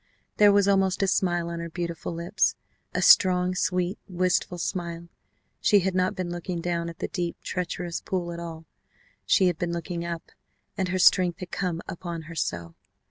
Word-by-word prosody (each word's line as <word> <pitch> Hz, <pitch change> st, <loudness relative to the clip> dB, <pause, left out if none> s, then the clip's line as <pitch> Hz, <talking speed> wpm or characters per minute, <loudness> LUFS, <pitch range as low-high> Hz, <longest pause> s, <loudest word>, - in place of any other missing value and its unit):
There 205 Hz, -1 st, +7 dB
was 200 Hz, -1 st, +4 dB
almost 195 Hz, -1 st, +2 dB
a -, -, +2 dB
smile 175 Hz, -3 st, +1 dB
on 170 Hz, 0 st, -4 dB
her 170 Hz, 0 st, -5 dB
beautiful 170 Hz, 0 st, -4 dB
lips, 170 Hz, +4 st, 0 dB, 0.4 s
a -, -, -1 dB
strong, 180 Hz, -1 st, +6 dB
sweet, 180 Hz, +1 st, 0 dB
wistful 180 Hz, -1 st, 0 dB
smile. 170 Hz, -1 st, -4 dB, 0.5 s
She 205 Hz, -2 st, +4 dB
had 190 Hz, +1 st, 0 dB
not 185 Hz, 0 st, +1 dB
been 180 Hz, -2 st, -3 dB
looking 175 Hz, 0 st, -4 dB
down 170 Hz, 0 st, -2 dB
at 165 Hz, -, -10 dB
the -, -, -3 dB
deep, 175 Hz, -2 st, -3 dB
treacherous 175 Hz, -1 st, -3 dB
pool 175 Hz, -2 st, -3 dB
at 170 Hz, -, -6 dB
all. 165 Hz, -1 st, -7 dB, 0.6 s
She 190 Hz, -, +5 dB
had 175 Hz, -3 st, +1 dB
been 175 Hz, -1 st, -1 dB
looking 170 Hz, 0 st, -4 dB
up 170 Hz, -1 st, -6 dB, 0.4 s
and 190 Hz, -, -1 dB
her 185 Hz, +1 st, -1 dB
strength 180 Hz, -1 st, +4 dB
had 180 Hz, -1 st, -7 dB
come 175 Hz, -3 st, -2 dB
upon 170 Hz, -1 st, -5 dB
her 165 Hz, +1 st, -10 dB
so. 85 Hz, -, -3 dB
175 Hz, 185 wpm, -26 LUFS, 170-185 Hz, 0.6 s, There